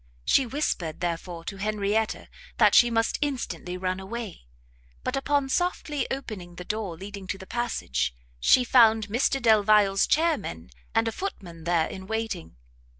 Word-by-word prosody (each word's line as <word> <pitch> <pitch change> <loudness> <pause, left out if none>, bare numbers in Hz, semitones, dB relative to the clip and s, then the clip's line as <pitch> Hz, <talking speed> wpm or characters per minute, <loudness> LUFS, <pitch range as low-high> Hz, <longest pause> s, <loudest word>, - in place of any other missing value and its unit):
She 265 - +4
whispered, 225 - -2
therefore, 170 0 -3
to 195 - -5
Henrietta, 210 +1 -1 0.3
that - - +5
she 240 - +7
must 225 -1 0
instantly 255 -10 -3
run 185 0 -2
away, 195 - -7 0.6
but, - - -1
upon 280 0 +1
softly 305 -1 -1
opening 205 -10 -6
the 180 - -8
door 210 -5 -3
leading 195 +1 -8
to 190 - -3
the 190 - -10
passage, 70 - -2 0.2
she 250 - +5
found 225 -4 +5
Mr 260 +5 +1
Delvile's 210 -4 +4
chairmen, 225 - 0 0.2
and 225 0 +3
a - - 0
footman 175 - -6
there 170 -2 +2
in 190 +2 -8
waiting. 220 - -4
210 Hz, 150 wpm, -26 LUFS, 180-240 Hz, 0.6 s, she